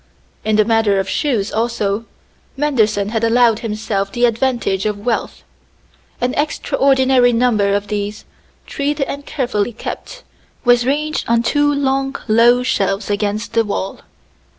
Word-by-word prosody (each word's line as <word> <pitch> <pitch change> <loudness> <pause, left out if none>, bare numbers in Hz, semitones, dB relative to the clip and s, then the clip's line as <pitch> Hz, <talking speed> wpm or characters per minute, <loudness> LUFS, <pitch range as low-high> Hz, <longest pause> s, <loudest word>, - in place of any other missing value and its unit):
In 215 0 +1
the 215 0 +4
matter 225 -3 +2
of 190 - -2
shoes, 230 -8 -1
also, 225 -2 -1 0.5
Manderson 220 -8 +1
had 225 0 -2
allowed 230 -1 +3
himself 210 -3 -3
the 240 +3 +2
advantage 230 -4 0
of 205 -1 -4
wealth. 240 -2 -2 0.8
An 250 +1 0
extraordinary 265 -3 +2
number 225 -4 +2
of 205 0 -2
these, 205 +1 -4 0.4
treed 290 +2 -2
and 280 +1 -4
carefully 240 -5 -1
kept, - - -7 0.4
was 245 0 +4
ranged 300 +2 -1
on 235 0 +3
two 290 +4 +2
long 270 -1 0
low 235 +3 +4
shelves 200 -3 -1
against 205 +2 -2
the 230 - +3
wall. 200 -2 -4
230 Hz, 135 wpm, -18 LUFS, 210-265 Hz, 0.8 s, the